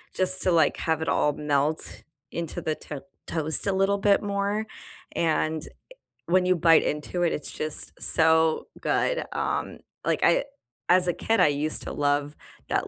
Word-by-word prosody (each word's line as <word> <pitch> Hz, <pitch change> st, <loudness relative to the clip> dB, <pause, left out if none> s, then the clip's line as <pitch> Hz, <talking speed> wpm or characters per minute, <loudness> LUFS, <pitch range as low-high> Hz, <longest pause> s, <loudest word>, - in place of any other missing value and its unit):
just 185 Hz, 0 st, +2 dB
to, 185 Hz, -, +2 dB
like, 160 Hz, -3 st, +3 dB
have 160 Hz, -1 st, -1 dB
it 160 Hz, -, -2 dB
all 150 Hz, -, +2 dB
melt 150 Hz, +1 st, -1 dB, 0.3 s
into 165 Hz, -2 st, -4 dB
the 155 Hz, -, -2 dB
t 150 Hz, -, -8 dB, 0.3 s
toast 160 Hz, +3 st, +2 dB
a 200 Hz, -, +2 dB
little 195 Hz, +1 st, +2 dB
bit 200 Hz, 0 st, +3 dB
more, 200 Hz, +1 st, -1 dB, 0.5 s
and, 160 Hz, -1 st, 0 dB
eh, -, -, -11 dB, 0.6 s
when 180 Hz, +1 st, +3 dB
you 185 Hz, 0 st, +3 dB
bite 165 Hz, -1 st, +5 dB
into 150 Hz, +4 st, -2 dB
it, 170 Hz, -, +1 dB
it's 150 Hz, -, -5 dB
just 155 Hz, 0 st, -1 dB
so 160 Hz, 0 st, +3 dB
good, -, -, 0 dB
um, -, -, -3 dB, 0.3 s
like, -, -, 0 dB
I -, -, +4 dB, 0.5 s
as 180 Hz, 0 st, +5 dB
a 175 Hz, -, +1 dB
kid, 225 Hz, +6 st, 0 dB
I -, -, +6 dB
used 150 Hz, +1 st, -1 dB
to -, -, -6 dB
love 145 Hz, 0 st, 0 dB, 0.3 s
that -, -, 0 dB
160 Hz, 170 wpm, -25 LUFS, 150-185 Hz, 0.6 s, I